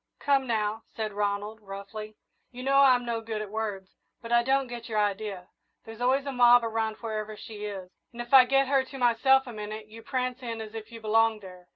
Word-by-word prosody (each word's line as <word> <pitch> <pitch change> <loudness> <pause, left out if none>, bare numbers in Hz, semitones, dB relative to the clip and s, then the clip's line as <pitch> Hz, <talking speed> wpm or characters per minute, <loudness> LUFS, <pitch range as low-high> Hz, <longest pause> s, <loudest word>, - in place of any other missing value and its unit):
"Come 275 -2 +1
now," 220 -1 -1
said 215 -2 -5
Ronald, 205 +1 -2
roughly; 210 +2 -8 0.3
"you 250 0 -9
know 275 +1 +3
I'm 255 -3 +5
no 230 -1 -2
good 220 -1 -4
at 210 -2 -6
words, 205 -3 -4 0.3
but 230 - -9
I 235 0 +5
don't 270 +2 +1
get 240 -2 -8
your 215 - -2
idea. 205 -3 -2 0.4
There's 225 +1 -10
always 265 +3 +2
a 280 - -3
mob 245 -1 +6
around 225 -1 -1
wherever 215 -2 -4
she 210 -1 -8
is, 190 -3 -7 0.2
and 235 - -13
if 240 +2 -6
I 260 -2 +10
get 270 +1 +3
her 270 -1 +3
to 270 +1 -10
myself 265 +2 +4
a 245 - -8
minute 215 0 -7
you 225 +1 -11
prance 255 +2 -3
in 230 -2 -5
as 220 -1 -8
if 225 0 -8
you 230 -1 -10
belonged 220 0 +2
there. 180 -2 -13
225 Hz, 220 wpm, -28 LUFS, 215-245 Hz, 0.4 s, I